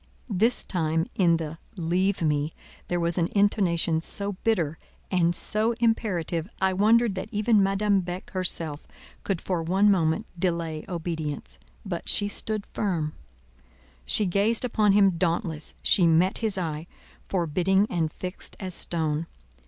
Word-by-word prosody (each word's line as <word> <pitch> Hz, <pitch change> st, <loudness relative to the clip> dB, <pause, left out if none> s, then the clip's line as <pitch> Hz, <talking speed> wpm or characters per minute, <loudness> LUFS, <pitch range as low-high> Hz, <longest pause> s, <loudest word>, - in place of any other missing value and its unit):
_" -, -, -33 dB, 0.2 s
This 225 Hz, +2 st, +2 dB
time, 160 Hz, -2 st, 0 dB
in 170 Hz, -3 st, +3 dB
the 160 Hz, 0 st, -6 dB, 0.2 s
"leave 180 Hz, +2 st, 0 dB
me" 150 Hz, 0 st, 0 dB, 0.3 s
there 175 Hz, -, -1 dB
was 170 Hz, +1 st, 0 dB
an 170 Hz, -, +2 dB
intonation 175 Hz, -5 st, +2 dB
so 200 Hz, +4 st, -4 dB
bitter 170 Hz, -9 st, 0 dB, 0.3 s
and 175 Hz, -2 st, +2 dB
so 220 Hz, +6 st, +3 dB
imperative, 200 Hz, -8 st, 0 dB
I 190 Hz, 0 st, +2 dB
wondered 220 Hz, +3 st, +4 dB
that 190 Hz, -, -5 dB
even 215 Hz, 0 st, +3 dB
Madame 195 Hz, +1 st, +2 dB
Beck 180 Hz, +6 st, -6 dB
herself 165 Hz, -6 st, -1 dB, 0.4 s
could 195 Hz, -4 st, -1 dB
for 180 Hz, -1 st, -2 dB
one 190 Hz, +5 st, +3 dB
moment 170 Hz, +3 st, +1 dB
delay 170 Hz, -3 st, -2 dB
obedience; 160 Hz, -4 st, -4 dB, 0.3 s
but 175 Hz, -4 st, -4 dB
she 205 Hz, -, +3 dB
stood 210 Hz, 0 st, -4 dB
firm; 165 Hz, -7 st, -2 dB, 0.9 s
she 205 Hz, -, +1 dB
gazed 205 Hz, +6 st, +1 dB
upon 215 Hz, -4 st, +3 dB
him 195 Hz, -4 st, +4 dB
dauntless; 165 Hz, -3 st, -1 dB
she 180 Hz, -3 st, +5 dB
met 170 Hz, +4 st, +3 dB
his 220 Hz, -4 st, -1 dB
eye, 160 Hz, -2 st, -3 dB, 0.4 s
forbidding 185 Hz, +3 st, +2 dB
and 165 Hz, -5 st, -1 dB
fixed 180 Hz, +3 st, -7 dB
as 185 Hz, -2 st, -5 dB
stone. 160 Hz, -2 st, -1 dB
180 Hz, 145 wpm, -26 LUFS, 165-200 Hz, 0.9 s, she